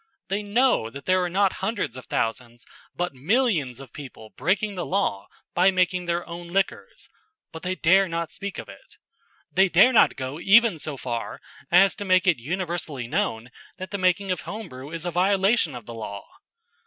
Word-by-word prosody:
They 200 Hz, +2 st, -1 dB
know 210 Hz, -, +2 dB
that 140 Hz, +4 st, -10 dB
there 185 Hz, 0 st, +3 dB
are 180 Hz, -, -1 dB
not 195 Hz, +2 st, +2 dB
hundreds 195 Hz, -, -2 dB
of 130 Hz, -, -10 dB
thousands 120 Hz, +1 st, -3 dB, 0.3 s
but 175 Hz, -3 st, -2 dB
millions 155 Hz, -, 0 dB
of 135 Hz, -3 st, -12 dB
people 125 Hz, -6 st, -10 dB
breaking 205 Hz, +2 st, 0 dB
the 180 Hz, -2 st, -4 dB
law 175 Hz, -, -1 dB, 0.3 s
by 180 Hz, +2 st, +4 dB
making 185 Hz, -1 st, +1 dB
their 170 Hz, 0 st, -1 dB
own 170 Hz, 0 st, -8 dB
liquors, 195 Hz, +3 st, -2 dB, 0.4 s
but 160 Hz, -, -9 dB
they 185 Hz, +1 st, -2 dB
dare 190 Hz, +3 st, +4 dB
not 170 Hz, -1 st, -3 dB
speak 200 Hz, 0 st, -6 dB
of -, -, -7 dB
it. -, -, -15 dB, 0.5 s
They 190 Hz, +1 st, +4 dB
dare 195 Hz, +9 st, +6 dB
not 230 Hz, -, +5 dB
go 130 Hz, +3 st, -5 dB
even 210 Hz, -1 st, +5 dB
so 150 Hz, -1 st, -4 dB
far 120 Hz, -3 st, -4 dB, 0.3 s
as 185 Hz, +2 st, +5 dB
to -, -, -4 dB
make 185 Hz, -1 st, +3 dB
it 175 Hz, -8 st, +3 dB
universally 165 Hz, -2 st, -3 dB
known 115 Hz, 0 st, -2 dB, 0.3 s
that 185 Hz, 0 st, -7 dB
the 200 Hz, -, -3 dB
making 185 Hz, +1 st, +1 dB
of 180 Hz, -3 st, -2 dB
home 215 Hz, -3 st, -7 dB
brew 130 Hz, +2 st, -9 dB
is 165 Hz, 0 st, -4 dB
a 175 Hz, -, -1 dB
violation 190 Hz, -, +2 dB
of 120 Hz, -3 st, -9 dB
the 120 Hz, -, -8 dB
law. 105 Hz, -3 st, -7 dB
175 Hz, 190 wpm, -24 LUFS, 135-195 Hz, 0.5 s, dare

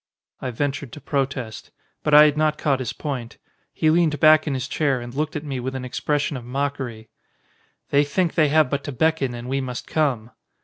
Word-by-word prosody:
I 130 Hz, -, -3 dB
ventured 135 Hz, +1 st, -3 dB
to -, -, -8 dB
protest. 135 Hz, -5 st, -3 dB, 0.3 s
But 150 Hz, -1 st, +3 dB
I 150 Hz, 0 st, +10 dB
had 150 Hz, -1 st, +3 dB
not 155 Hz, 0 st, +1 dB
caught 140 Hz, -3 st, +1 dB
his 130 Hz, -, -3 dB
point. 130 Hz, -6 st, -5 dB, 0.3 s
He 155 Hz, -, +2 dB
leaned 160 Hz, -3 st, +2 dB
back 155 Hz, +1 st, +6 dB
in 140 Hz, -, 0 dB
his 130 Hz, -, -3 dB
chair 140 Hz, -4 st, 0 dB
and 120 Hz, 0 st, -8 dB
looked 155 Hz, +2 st, -2 dB
at -, -, -3 dB
me 135 Hz, -4 st, -4 dB
with 130 Hz, +2 st, -4 dB
an 130 Hz, -1 st, -4 dB
expression 145 Hz, +3 st, -1 dB
of 125 Hz, -, -8 dB
mockery. 125 Hz, -4 st, -4 dB, 0.8 s
"They 140 Hz, +1 st, +5 dB
think 170 Hz, +4 st, 0 dB
they 155 Hz, -2 st, +4 dB
have 155 Hz, 0 st, +4 dB
but 140 Hz, -1 st, -1 dB
to 145 Hz, -, -4 dB
beckon 140 Hz, -2 st, 0 dB
and 120 Hz, +1 st, -7 dB
we 135 Hz, +1 st, -1 dB
must 125 Hz, -2 st, -5 dB
come." 130 Hz, -7 st, -1 dB
140 Hz, 210 wpm, -23 LUFS, 125-150 Hz, 0.8 s, I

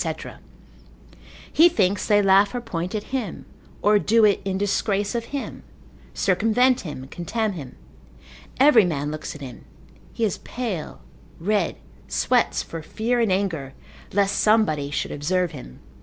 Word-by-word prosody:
He 335 Hz, +3 st, +7 dB
thinks 200 Hz, -, +1 dB
they 205 Hz, -1 st, +4 dB
laugh 195 Hz, +3 st, +4 dB
or -, -, 0 dB
point 180 Hz, -3 st, -4 dB
at 210 Hz, -, -2 dB
him, 240 Hz, -9 st, -3 dB, 0.4 s
or 210 Hz, 0 st, +5 dB
do 225 Hz, +2 st, +4 dB
it 205 Hz, -2 st, +3 dB
in 190 Hz, -1 st, -2 dB
disgrace 200 Hz, 0 st, 0 dB
of 235 Hz, -1 st, -2 dB
him, 280 Hz, +1 st, -6 dB, 0.5 s
circumvent 225 Hz, +6 st, +2 dB
him, 145 Hz, -6 st, -7 dB
contemn 215 Hz, +5 st, -2 dB
him; 140 Hz, -8 st, -8 dB, 0.8 s
every 265 Hz, -5 st, +7 dB
man 150 Hz, -4 st, -2 dB
looks 155 Hz, 0 st, -6 dB
at 145 Hz, -, -11 dB
him, 130 Hz, -3 st, -9 dB, 0.5 s
he 230 Hz, -, -1 dB
is 200 Hz, -, -2 dB
pale, 225 Hz, -10 st, -5 dB, 0.4 s
red, 195 Hz, 0 st, 0 dB, 0.3 s
sweats -, -, +1 dB
for 165 Hz, -, -7 dB
fear 230 Hz, +9 st, -1 dB
and 225 Hz, -4 st, +2 dB
anger, 165 Hz, -9 st, -1 dB, 0.4 s
lest 200 Hz, 0 st, +1 dB
somebody 185 Hz, -10 st, +2 dB
should 145 Hz, -, -3 dB
observe 175 Hz, +4 st, 0 dB
him. 125 Hz, -, -11 dB
200 Hz, 140 wpm, -23 LUFS, 165-220 Hz, 0.8 s, He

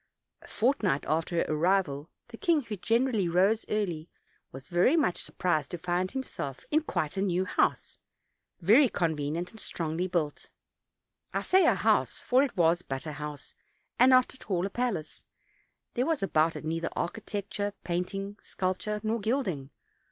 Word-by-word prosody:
A -, -, -14 dB
fortnight 215 Hz, -, +1 dB
after 160 Hz, +3 st, -1 dB
her 165 Hz, -, +2 dB
arrival 155 Hz, -2 st, +1 dB, 0.2 s
the 230 Hz, -, -10 dB
king, 330 Hz, +1 st, +2 dB
who 225 Hz, -3 st, -5 dB
generally 225 Hz, -1 st, +1 dB
rose 195 Hz, +6 st, +2 dB
early, 175 Hz, -7 st, -2 dB, 0.4 s
was 135 Hz, +1 st, -9 dB
very 180 Hz, -, +3 dB
much 280 Hz, -, +1 dB
surprised 155 Hz, -5 st, -1 dB
to 175 Hz, -, -4 dB
find 180 Hz, +2 st, -1 dB
himself 165 Hz, -, -5 dB
in 310 Hz, +1 st, +4 dB
quite 175 Hz, -, -2 dB
a -, -, +1 dB
new 185 Hz, -1 st, +1 dB
house, -, -, 0 dB, 0.6 s
very 235 Hz, -, +6 dB
convenient 165 Hz, 0 st, -1 dB
and 220 Hz, -, -14 dB
strongly 165 Hz, 0 st, -2 dB
built: 165 Hz, -5 st, -2 dB, 0.9 s
I -, -, 0 dB
say 370 Hz, -2 st, +4 dB
a -, -, +5 dB
house; -, -, +2 dB
for 255 Hz, +1 st, +3 dB
it 270 Hz, -7 st, -1 dB
was 170 Hz, 0 st, +4 dB
but 135 Hz, -3 st, -5 dB
a 155 Hz, -, -4 dB
house, 150 Hz, -1 st, -7 dB, 0.5 s
and 255 Hz, -, +7 dB
not 255 Hz, -1 st, +5 dB
at 260 Hz, -, -12 dB
all 180 Hz, -2 st, +1 dB
a 195 Hz, -, -4 dB
palace; 215 Hz, -11 st, -3 dB, 0.7 s
there 250 Hz, +2 st, 0 dB
was 320 Hz, -9 st, 0 dB
about 160 Hz, -3 st, +2 dB
it -, -, -7 dB
neither 165 Hz, +1 st, -1 dB
architec 205 Hz, +1 st, -3 dB
ture, 205 Hz, 0 st, -2 dB
painting, 195 Hz, +3 st, -3 dB
sculpture, 190 Hz, +3 st, -2 dB
nor 220 Hz, +2 st, 0 dB
gilding. 200 Hz, -, -1 dB
185 Hz, 165 wpm, -29 LUFS, 165-225 Hz, 0.9 s, and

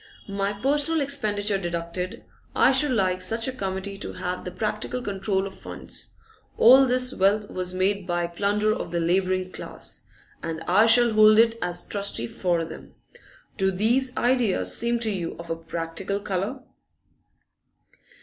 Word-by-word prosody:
My 200 Hz, 0 st, -1 dB
personal 290 Hz, +9 st, +1 dB
expenditure 210 Hz, -8 st, 0 dB
deducted, 175 Hz, +1 st, -4 dB, 0.3 s
I -, -, +5 dB
should 270 Hz, +2 st, +3 dB
like 185 Hz, -6 st, +1 dB
such 225 Hz, +4 st, 0 dB
a -, -, -1 dB
committee 195 Hz, -4 st, -4 dB
to -, -, -6 dB
have 180 Hz, 0 st, -4 dB
the -, -, -5 dB
practical 215 Hz, +6 st, -3 dB
control 195 Hz, -3 st, -1 dB
of 195 Hz, -, -7 dB
funds. 190 Hz, -, -7 dB, 0.4 s
All 260 Hz, +3 st, +7 dB
this 250 Hz, +1 st, +2 dB
wealth 205 Hz, +2 st, +1 dB
was 185 Hz, 0 st, -3 dB
made 195 Hz, +1 st, 0 dB
by 175 Hz, -1 st, 0 dB
plunder 205 Hz, +5 st, 0 dB
of -, -, -5 dB
the 170 Hz, -, -1 dB
labouring 185 Hz, +2 st, 0 dB
class, -, -, -6 dB, 0.4 s
and 165 Hz, -1 st, -4 dB
I 210 Hz, +6 st, +4 dB
shall 235 Hz, 0 st, +5 dB
hold 215 Hz, 0 st, +6 dB
it 230 Hz, 0 st, +5 dB
as 175 Hz, 0 st, -2 dB
trustee 200 Hz, -, -1 dB
for 170 Hz, +6 st, -1 dB
them. -, -, -11 dB, 0.6 s
Do 190 Hz, -2 st, +2 dB
these 235 Hz, +7 st, +1 dB
ideas 245 Hz, -5 st, +2 dB
seem 235 Hz, 0 st, +2 dB
to 220 Hz, -2 st, 0 dB
you 175 Hz, -4 st, -4 dB
of 170 Hz, 0 st, -8 dB
a -, -, 0 dB
practical 165 Hz, +4 st, -4 dB
colour? 205 Hz, +7 st, -3 dB
200 Hz, 155 wpm, -25 LUFS, 180-225 Hz, 0.6 s, All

